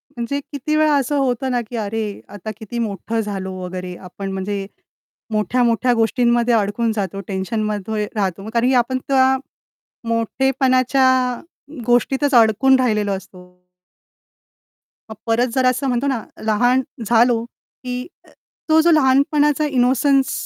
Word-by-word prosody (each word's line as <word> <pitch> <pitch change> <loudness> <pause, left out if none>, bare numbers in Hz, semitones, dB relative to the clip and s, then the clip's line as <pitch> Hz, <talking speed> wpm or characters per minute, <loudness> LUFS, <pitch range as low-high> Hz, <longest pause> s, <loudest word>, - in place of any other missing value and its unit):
म्हणजे 240 +4 -3
किती 290 +2 -2
वेळा 305 -1 +3
असं 280 +1 0
होतं 260 -1 0
ना, 245 -1 0
की 235 +2 -9
अरे 215 -1 -3
आता 210 +2 -6
किती 230 +2 -6
मोठं 225 +1 -3
झालो 195 -3 -4
वगैरे, 180 0 -6
आपण 195 +2 -8
म्हणजे 195 +1 -3 0.7
मोठ्या-मोठ्या 235 +3 +1
गोष्टींमध्ये 235 +1 +2
अडकून 220 +2 0
जातो 195 -1 -3
टेन्शनमध्ये 210 +1 -2
राहतो, 195 +1 -2
कारण 235 +1 +2
की 265 - +2
आपण 250 +1 +1
त्या 265 -1 +4 0.7
मोठेपणाच्या 260 +3 +1 0.8
गोष्टीतच 270 +4 +2
अडकून 235 +4 +5
राहिलेलो 210 -5 +1
असतो. 180 -1 -9 1.4
मग 220 - -8
परत 235 +2 +2
जरा 255 -1 +4
असं 265 +2 -1
म्हणतो 250 +2 0
ना, 250 -5 -1 0.2
लहान 245 +4 +3 0.2
झालो 235 +1 +3
की 250 +2 -8 0.2
अ, - - -20 0.4
तो 315 0 +5
जो 340 +1 +4
लहानपणाचा 295 +1 +3
इनोसन्स 265 +1 +2
235 Hz, 130 wpm, -20 LUFS, 210-260 Hz, 1.4 s, अडकून